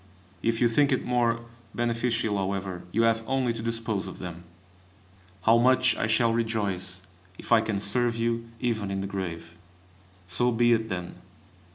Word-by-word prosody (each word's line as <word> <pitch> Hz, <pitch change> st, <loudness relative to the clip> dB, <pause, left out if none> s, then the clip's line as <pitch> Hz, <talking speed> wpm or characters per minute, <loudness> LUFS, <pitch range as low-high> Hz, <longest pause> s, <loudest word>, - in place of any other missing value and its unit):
If 115 Hz, 0 st, 0 dB
you 120 Hz, -, +4 dB
think 140 Hz, +5 st, +3 dB
it 130 Hz, -, 0 dB
more 120 Hz, -1 st, +1 dB, 0.3 s
beneficial, 115 Hz, -2 st, 0 dB
however, 95 Hz, -2 st, -3 dB
you 115 Hz, -, +2 dB
have 115 Hz, 0 st, +2 dB
only 130 Hz, -3 st, +1 dB
to 115 Hz, -, -5 dB
dispose 115 Hz, -3 st, -2 dB
of -, -, -8 dB
them. 85 Hz, -1 st, -8 dB, 1.0 s
How 115 Hz, +1 st, +5 dB
much 130 Hz, +1 st, +4 dB
I -, -, -1 dB
shall 115 Hz, +1 st, +3 dB
rejoice 100 Hz, -5 st, -1 dB, 0.3 s
if -, -, -10 dB
I 115 Hz, -1 st, +7 dB
can 105 Hz, -3 st, -2 dB
serve 115 Hz, +4 st, +2 dB
you 115 Hz, 0 st, -1 dB
even 110 Hz, -4 st, -1 dB
in 95 Hz, 0 st, -2 dB
the -, -, -3 dB
grave! 85 Hz, -4 st, -5 dB, 0.7 s
So 120 Hz, +8 st, +1 dB
be 120 Hz, +1 st, +4 dB
it 110 Hz, -1 st, 0 dB
then! 90 Hz, -2 st, -5 dB
115 Hz, 165 wpm, -27 LUFS, 100-120 Hz, 1.0 s, I